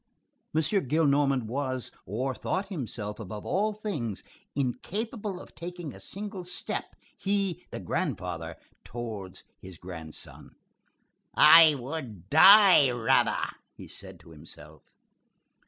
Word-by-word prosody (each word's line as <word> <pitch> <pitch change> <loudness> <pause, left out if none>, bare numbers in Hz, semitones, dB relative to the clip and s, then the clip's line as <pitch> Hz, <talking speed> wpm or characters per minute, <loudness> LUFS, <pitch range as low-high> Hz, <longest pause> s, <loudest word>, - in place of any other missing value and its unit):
M. 160 - +3
Gillenormand 145 - +2
was, 130 +2 -4 0.2
or 125 +7 -2
thought 190 - -3
himself, 115 - -6
above 105 0 -7
all 210 +3 0
things, 160 - -5 0.3
incapable 200 - -3
of - - -13
taking 175 -4 -7
a 95 - -12
single 200 - -7
step, 180 0 -5 0.2
he—the 195 -3 -2
grandfather, 90 - -3 0.3
towards 110 -6 -7 0.2
his 95 -2 -12
grandson; 80 -3 -10 0.8
"I 160 -2 +8
would 125 - -7
die 190 -3 +8
rather," 120 -2 +2 0.3
he - - -11
said - - -10
to 85 - -17
himself. 75 -1 -13
135 Hz, 105 wpm, -28 LUFS, -, 0.8 s, I